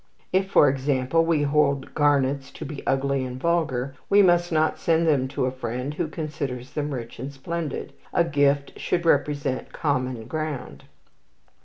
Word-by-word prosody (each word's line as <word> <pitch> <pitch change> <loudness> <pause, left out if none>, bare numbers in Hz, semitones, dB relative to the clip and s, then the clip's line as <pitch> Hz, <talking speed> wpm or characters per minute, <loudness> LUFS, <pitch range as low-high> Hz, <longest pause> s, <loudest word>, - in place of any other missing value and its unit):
If, 190 +1 +2
for 150 - +6
example, 135 +3 +1
we 160 -3 +2
hold 140 -2 +1
garnets 140 -2 +2
to - - -7
be 145 -3 -6
ugly 135 0 +1
and 125 0 -5
vulgar, 140 -5 0 0.2
we 205 0 +6
must 175 -1 +3
not 155 -1 +1
send 165 -1 +2
them 140 -5 +2
to 130 - -1
a 130 - 0
friend 125 +2 -4
who 160 +2 -2
considers 145 -5 -5
them 150 0 -3
rich 120 -4 -6
and 135 +3 -5
splendid. 155 +2 -5 0.2
"A 170 - +3
gift 145 -3 +1
should 175 -1 -1
represent 145 -3 +1
common 130 -5 -1
ground." 155 -3 -5
145 Hz, 160 wpm, -25 LUFS, 130-160 Hz, 0.2 s, for